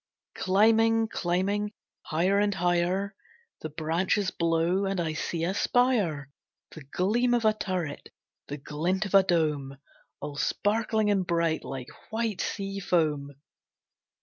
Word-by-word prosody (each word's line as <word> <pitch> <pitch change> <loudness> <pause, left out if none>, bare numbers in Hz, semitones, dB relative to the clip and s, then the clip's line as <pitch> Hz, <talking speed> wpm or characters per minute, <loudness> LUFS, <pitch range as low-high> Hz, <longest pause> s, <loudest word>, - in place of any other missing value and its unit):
Climbing, 225 +3 +3
climbing, 200 +4 -1 0.3
higher 185 +6 +2
and 205 -1 +1
higher, 180 +3 0 0.5
The 155 - -5
branches 170 +6 0
blow 170 +3 +1
and 195 -1 -1
I 160 -2 -1
see 165 +1 -3
a 180 +3 0
spire, 200 - +1 0.4
The 160 - -10
gleam 225 - +1
of 235 -2 0
a 215 - +5
turret, 185 -8 -4 0.4
the 145 - -5
glint 170 +8 -1
of 200 - -7
a 195 - +8
dome, 150 -7 0 0.4
All 145 0 -6
sparkling 215 +4 +1
and 195 -2 +2
bright, 170 -2 +1
like 130 -2 -6 0.2
white 220 -3 -2
sea 195 -1 -3
foam. 150 -6 0
185 Hz, 130 wpm, -28 LUFS, 160-205 Hz, 0.5 s, a